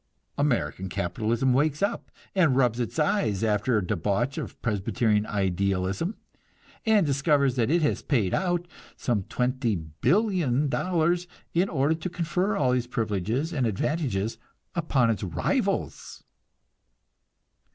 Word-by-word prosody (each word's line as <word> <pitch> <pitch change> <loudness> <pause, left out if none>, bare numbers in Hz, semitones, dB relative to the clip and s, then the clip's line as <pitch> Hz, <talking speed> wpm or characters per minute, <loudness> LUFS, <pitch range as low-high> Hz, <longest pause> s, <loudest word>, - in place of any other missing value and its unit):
American 120 -9 0
capitalism 110 +7 0
wakes 150 +5 +1
up, 200 - -1 0.2
and 165 -9 +3
rubs 125 -3 +2
its 120 - -3
eyes 135 - +1
after 110 +2 +2
a 100 - 0
debauch 105 - -1
of - - -7
Presbyterian 105 0 +1
idealism, 95 - -1 0.7
and 215 -5 +5
discovers 140 -1 +2
that 120 -2 +1
it 165 +1 +3
has 150 - +1
paid 110 - +1
out 175 -2 0 0.3
some 115 -5 0
$20,000,000,000, 145 - 0 0.3
in 180 +3 +2
order 145 0 +2
to 160 +3 -4
confer 180 +4 -1
all 130 -3 +2
these 125 -1 0
privileges 115 - -1
and 130 -5 +1
advantages 110 - -1 0.3
upon 140 -9 +2
its 110 - -3
rivals! 85 -5 -2
125 Hz, 120 wpm, -26 LUFS, 105-160 Hz, 0.7 s, and